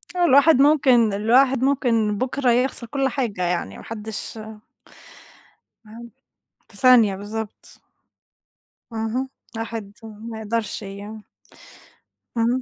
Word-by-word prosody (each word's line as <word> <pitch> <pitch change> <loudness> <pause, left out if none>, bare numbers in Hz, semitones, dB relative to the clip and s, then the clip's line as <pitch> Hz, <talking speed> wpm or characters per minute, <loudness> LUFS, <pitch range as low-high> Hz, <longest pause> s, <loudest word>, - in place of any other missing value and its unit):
الواحد 320 -4 +5
ممكن 260 -7 +4
الواحد 255 +5 +3
ممكن 230 -6 +1
بُكرة 255 +1 0
يخسَر 245 0 0
كل 270 +2 0
حاجة 235 -8 -3
يعني، 175 - -2
ما - - -11
حدّش 220 0 -7 1.5
ما 215 +1 -14
حدّ 235 0 -10 0.6
في - - -12
ثانية، 240 -7 +5
بالضبط. 210 +2 -8 1.1
اهم، 225 +4 -2 0.3
الواحد 225 -3 -6
ما 220 +1 -9
يقدَرش 220 0 -3
يع 205 +2 -9 1.2
إمم. 240 +3 +1
230 Hz, 105 wpm, -22 LUFS, 215-255 Hz, 1.5 s, الواحد